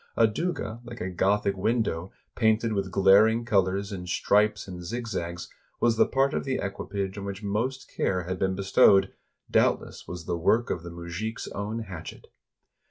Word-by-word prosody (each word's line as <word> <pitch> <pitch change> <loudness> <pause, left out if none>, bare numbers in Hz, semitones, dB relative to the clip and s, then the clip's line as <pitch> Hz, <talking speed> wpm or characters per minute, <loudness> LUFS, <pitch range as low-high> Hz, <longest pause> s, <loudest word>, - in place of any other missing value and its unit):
A 115 - +6
douga 115 -1 -2
like 120 -1 -9
a 95 - -3
Gothic 100 +2 +1
window, 95 -4 -1 0.2
painted 110 0 +2
with 100 -2 -1
glaring 105 +5 +5
colors 100 -2 +1
in 90 -3 -6
stripes 105 +3 +2
and 90 -2 -7
zigzags, 90 -5 -4 0.3
was 120 -1 +3
the - - +4
part 135 +1 +2
of - - -1
the 135 -1 -1
equipage 100 -1 -4
on 100 - -6
which 100 +1 -6
most 120 +6 -2
care 90 -1 -1
had 95 +2 -4
been 95 0 +1
bestowed 95 0 +4 0.2
— - - -30
doubtless - - +1
was 90 -2 -7
the 85 0 -2
work 115 +8 +2
of 85 - -2
the 85 - -8
mujik 85 +6 -5
's - - -6
own 105 +3 -4
hatchet. 90 -6 -9
100 Hz, 175 wpm, -27 LUFS, 95-110 Hz, 0.3 s, A